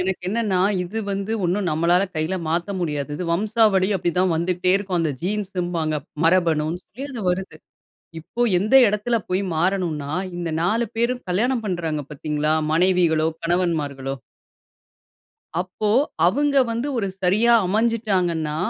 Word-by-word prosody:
எனக்கு 185 0 -2
என்னன்னா, 210 -4 0 0.2
இது 185 +5 -5
வந்து 200 +2 -2
ஒண்ணும் 180 +1 0
நம்மளால 170 +4 +3
கையில 155 +4 -1
மாத்த 170 +4 -1
முடியாது 150 -4 -2
இது 180 - -4
வம்சாவழி 205 0 +2
அப்டிதான் 180 +1 +1
வந்துட்டே 180 +2 0
இருக்கும் 190 -3 -2
அந்த 160 -2 0
ஜீன்ஸ்ன்பாங்க. 180 -5 -2 0.3
மரபணு 165 -3 +3 0.2
சொல்லி 255 +7 -9
அது 245 -4 -6
வருது. 190 +2 -4 0.6
இப்போ 235 +9 -6 0.2
எந்த 215 +7 +2
எடத்தில 210 +3 0
போய் 185 +2 +1
மாறனும்ன்னா? 165 -5 -1 0.3
இந்த 170 -1 -3
4 220 +7 +1
பேரும் 245 +2 0
கல்யாணம் 230 +6 +1
பண்றாங்க 165 -5 -2
பார்த்தீங்களா? 150 +1 -1 0.2
மனைவிகளோ, 170 -2 +3 0.2
கணவன்மார்களோ 155 -6 -1 1.5
அப்போ 185 +3 -2 0.4
அவுங்க 280 +9 +1
வந்து, 235 +5 -2
ஒரு 200 - 0 0.2
சரியா 215 +6 +3
அமஞ்சுட்டாங்கன்னா, 185 -7 0
180 Hz, 125 wpm, -22 LUFS, 165-210 Hz, 1.5 s, நம்மளால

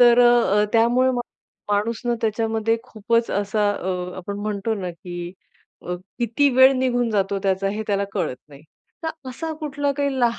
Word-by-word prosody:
तर 240 0 +7
अ, 240 -4 +5
अ, 210 - +4
त्यामुळे 240 +3 +4
मग 245 -1 -1 0.5
माणूस 215 +3 0
ना 240 0 +1
त्याच्यामध्ये 225 0 0
खूपच 230 +2 0
असा 205 +1 +1
अ, 180 -2 -3
आपण 200 +2 -5
म्हणतो 210 +1 -1
ना 180 - -3
की 175 +1 -7 0.5
अ, 180 - -3 0.2
किती 240 +4 +2
वेळ 260 +1 +8
निघून 245 -2 +1
जातो 200 -1 0
त्याचा 195 0 +1
हे 215 - -3
त्याला 200 -1 +1
कळत 125 - -2
नाही. 140 -1 -14 0.4
तर 320 -4 -5
असा 320 +6 -4
कुठला 285 -1 -1
काही 280 -2 0
लहा 235 -1 +2
225 Hz, 175 wpm, -23 LUFS, 200-245 Hz, 0.5 s, वेळ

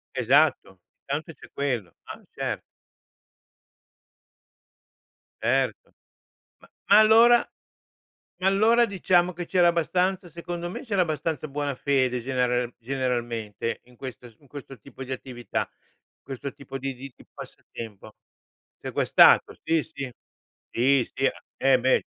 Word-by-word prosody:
Esatto, 125 - +2 0.2
intanto 155 +4 -4
c'è - - -16
quello, 125 - -2
ah, - - -10
cer - - -3 2.8
Certo. - - 0 0.6
Ma - - -20 0.2
ma 205 - +9
allora 230 +2 +6 0.9
ma 185 - 0
allora 220 +5 +4
diciamo 180 -3 +2
che 175 - -5
c'era 175 0 +3
abbastanza, 180 +2 0
secondo 175 +1 -5
me - - -6
c'era 200 -6 +1
abbastanza 155 -1 -2
buona 145 -1 -3
fede 130 -3 0
genera 125 -1 0
generalmente, 120 -3 -3
in 125 0 -21
questo 125 -2 -9
in 145 - -23
questo 135 -2 -10
tipo 130 +5 -10
di 130 - -6
attività, 125 -2 -4 0.5
questo 135 +1 -6
tipo 135 0 -8
di 135 0 -4
di 130 +1 -10
di - - -19
passatempo. 110 -2 -10 0.6
Sequestrato, - - +4
sì, 160 0 +2
sì, 140 -5 -7 0.6
sì, 130 +1 +2
sì 135 +1 +2 0.3
eh 135 -1 +4
beh 130 +1 +3
140 Hz, 120 wpm, -25 LUFS, 125-170 Hz, 2.8 s, ma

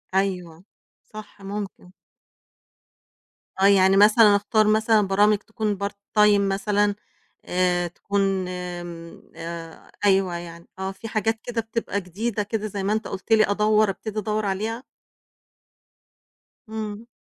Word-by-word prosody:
أيوه 180 -4 -1 0.4
صح، 215 -1 -12
ممكن. 195 -2 -7 1.7
آه، 195 - +4
يعني 195 -1 +5
مثلًا 210 0 +7
اختار 210 +1 +2
مثلًا 220 0 +4
برامج 205 +2 +4
تكون 215 -1 -3
part 200 0 -2 0.3
time 210 -1 +6
مثلًا 200 +1 +1 0.5
آآ 180 -1 +1
تكون 195 +1 -1
آمم، 175 -2 -7
آآ 165 0 -8
أيوه 190 -3 +3
يعني، 170 0 -9
آه 190 0 -2
في 195 +4 -9
حاجات 220 0 -1
كده 240 -1 -2
بتبقى 225 -2 -3
جديدة 205 +4 -3
كده 215 +1 -3
زي 200 -1 -4
ما 205 - +1
أنت 220 0 -2
قُلت 195 +3 -8
لي 220 -1 +6
أدوّر 215 0 +3
ابتدي 215 +2 -4
أدوّر 215 +1 -2
عليها؟ 220 +5 -2 1.9
إمم. 220 0 -6
200 Hz, 125 wpm, -24 LUFS, 185-215 Hz, 1.9 s, مثلًا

